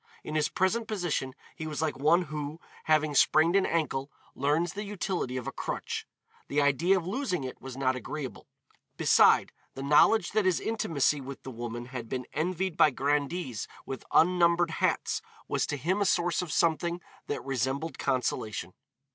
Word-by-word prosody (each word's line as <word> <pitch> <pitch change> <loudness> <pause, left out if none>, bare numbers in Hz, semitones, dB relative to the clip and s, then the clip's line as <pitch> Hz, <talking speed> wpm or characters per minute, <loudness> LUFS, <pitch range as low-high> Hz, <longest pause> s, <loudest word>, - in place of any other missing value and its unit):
In - - -6
his 155 -1 +1
present 215 +5 0
position 175 -11 -2 0.2
he 155 - -5
was 150 -2 -4
like 155 -3 0
one 155 +7 +3
who, 150 0 -5 0.3
having 155 -1 +3
sprained 155 +5 +4
an 195 -1 +4
ankle, 145 -4 -1 0.2
learns 150 +5 +1
the 205 - -4
utility 185 -10 -3
of 125 - -4
a - - -3
crutch. - - -4 0.4
The 145 - 0
idea 150 +7 +3
of 175 - -3
losing 190 - -2
it 130 - -7
was 130 -1 -8
not 130 -1 +1
agreeable. 135 +1 -6 0.5
Beside, - - +5 0.2
the 135 - -5
knowledge 175 +8 +4
that 215 -1 +1
his 185 -3 +3
intimacy 155 -10 0
with 135 0 -8
the 130 - -7
woman 120 0 -5
had 120 -3 -7
been 125 -1 -3
envied 180 +2 -1
by - - +7
grandees 145 0 -1 0.2
with 135 - -6
unnumbered 170 -1 +4
hats - - 0 0.3
was - - 0
to 145 - -2
him 180 +9 0
a - - +3
source 175 -2 +2
of 175 -4 -5
something 170 +1 +1 0.3
that - - -4
resembled 135 +4 -2
consolation. 110 -8 -1
155 Hz, 170 wpm, -29 LUFS, 135-175 Hz, 0.5 s, by